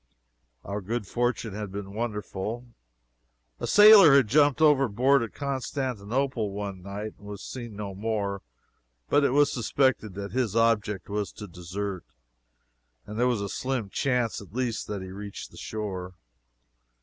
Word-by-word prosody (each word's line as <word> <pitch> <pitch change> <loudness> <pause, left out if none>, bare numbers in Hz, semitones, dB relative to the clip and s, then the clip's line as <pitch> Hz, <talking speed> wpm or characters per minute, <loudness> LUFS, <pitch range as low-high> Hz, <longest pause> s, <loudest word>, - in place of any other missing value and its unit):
Our 100 +2 -4
good 110 +3 -3
fortune 120 0 -1
had 105 -1 -5
been 100 0 -6
wonderful. 110 +1 -4 0.9
A - - -3
sailor 205 -8 +9
had 135 -5 +5
jumped 145 +2 +4
overboard 135 -3 +4
at 115 - -5
Constantinople 130 -4 -2
one 100 -1 -5
night, 100 +3 -6
and 105 - -13
was 100 -1 -7
seen 120 -4 -7
no 100 -1 -5
more, 100 -1 -2 0.7
but 145 - +4
it - - +4
was 145 +3 +4
suspected 120 -4 0
that 100 0 -5
his 120 -5 -1
object 110 -3 +1
was 105 0 -2
to 105 - -8
desert, 90 +1 -5 1.0
and 105 +2 -6
there 125 - +4
was 120 -5 0
a 100 - -2
slim 125 -2 -3
chance, 125 -6 0
at 100 +1 -14
least, 125 -3 -2
that 100 -2 -4
he 95 - -8
reached 100 +1 -8
the - - -15
shore. 95 -4 -5
110 Hz, 150 wpm, -27 LUFS, 100-130 Hz, 1.0 s, sailor